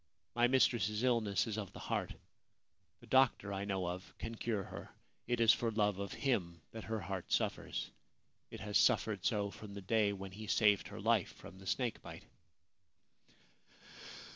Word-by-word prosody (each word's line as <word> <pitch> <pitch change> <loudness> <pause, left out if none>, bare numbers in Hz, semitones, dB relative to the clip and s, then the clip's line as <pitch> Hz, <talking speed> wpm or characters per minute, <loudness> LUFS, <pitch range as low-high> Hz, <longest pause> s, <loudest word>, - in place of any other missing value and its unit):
My 120 0 +4
mistress's 120 -4 +2
illness 115 -5 +2
is 110 -2 -3
of 100 -3 -6
the - - -9
heart. - - -2 0.9
The - - -13
doctor 130 -6 +3
I 100 +1 -3
know 95 -2 -1
of 90 +2 -6
can 115 - -5
cure 110 -3 -2
her. - - -9 0.4
It 120 0 0
is 115 -1 +7
for 115 - 0
love 105 -3 +1
of 100 0 -4
him 90 - -1
that 110 -1 -7
her 110 0 -2
heart 95 0 -5
suffers; - - -1 0.6
it - - -9
has 105 +1 +2
suffered 110 -5 +2
so 105 -4 0
from 100 -1 -10
the 100 - -6
day 105 +1 +2
when 95 -1 -6
he 105 +3 -8
saved 105 -2 +3
her - - -8
life - - +2
from 95 - -12
the 95 - -11
snake 120 +3 -1
bite.' - - -10
105 Hz, 170 wpm, -35 LUFS, 100-115 Hz, 0.9 s, is